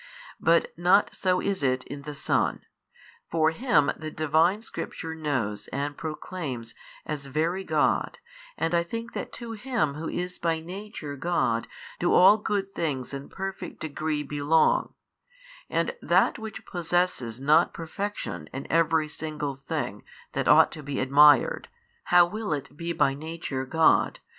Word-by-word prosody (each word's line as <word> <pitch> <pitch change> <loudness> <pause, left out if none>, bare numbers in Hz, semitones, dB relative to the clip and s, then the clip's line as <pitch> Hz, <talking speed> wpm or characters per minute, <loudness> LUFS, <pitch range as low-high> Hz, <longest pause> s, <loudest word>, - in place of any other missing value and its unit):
But 170 +1 +3
not 180 +4 +3
so 185 -1 +1
is 200 -4 -1
it 130 -1 +1
in 140 0 -8
the 145 +1 -7
Son; 155 - 0 0.6
for 160 -1 +3
Him 230 - +2
the 155 0 -6
Divine 160 +7 +2
Scripture 165 -7 -6
knows 135 -10 -2
and 145 +2 -3
proclaims 150 -7 -5 0.3
as 145 -2 -4
Very 165 +7 -1
God 155 -4 +1 0.4
and 165 +2 -1
I 170 - +4
think 230 +7 -6
that - - -5
to 235 -2 -7
Him 225 - -1
Who 155 +3 -5
is 180 +1 -4
by 165 -1 0
Nature 180 -3 -7
God 135 -7 0 0.3
do 175 - +2
all 195 +4 +7
good 200 -2 -2
things 140 -5 -3
in 140 0 -6
perfect 195 0 -6
degree 155 -1 -2
belong, 150 +2 +2 0.7
and 485 - 0
that - - +3
which 220 -1 -8
possesses 175 -9 -1
not 150 +5 +4
perfection 165 - -5
in 135 - -6
every 160 -1 +3
single 150 -2 -4
thing 135 +1 -4 0.3
that - - -2
ought - - +7
to 155 - -8
be 140 -1 -4
admired, 150 - +5 0.4
how 175 0 +6
will 210 0 -3
it 140 -1 -5
be 170 +2 -4
by 140 -5 +2
Nature 150 -3 -5
God? 160 +3 +3
160 Hz, 150 wpm, -27 LUFS, 145-180 Hz, 0.7 s, all